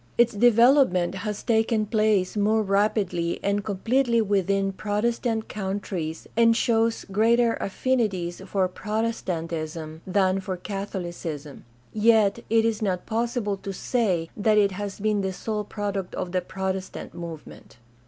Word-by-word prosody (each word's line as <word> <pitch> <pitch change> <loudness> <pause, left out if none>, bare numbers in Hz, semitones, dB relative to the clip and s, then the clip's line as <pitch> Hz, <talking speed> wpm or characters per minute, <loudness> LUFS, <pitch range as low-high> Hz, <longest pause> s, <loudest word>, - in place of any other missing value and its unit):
Its 240 0 +4
development 235 -4 +4
has 205 +2 -4
taken 225 -1 +2
place 215 -3 +1
more 215 +1 +2
rapidly 195 -4 0
and 200 0 0
completely 235 +4 +1
within 195 -2 +1
Protestant 220 +3 -1
countries 190 -5 -4
and 230 0 +5
shows 225 -1 +1
greater 230 +3 +3
affinities 195 -6 -1
for 190 -1 +1
Protestantism 165 -7 -3
than 190 0 +2
for 190 -1 -4
Catholicism; 175 -7 -6 0.3
yet 220 -1 +4
it 225 0 +3
is 225 -1 0
not 185 -4 -1
possible 230 -2 -1
to 195 - -6
say 190 -6 -1
that 215 +1 +2
it 200 -1 +4
has 200 +1 -5
been 210 0 +1
the 190 -1 -1
sole 210 +2 -3
product 200 -2 -4
of 175 - -4
the 185 0 0
Protestant 190 +1 -4
movement. 165 -7 -9
205 Hz, 130 wpm, -25 LUFS, 185-225 Hz, 0.3 s, and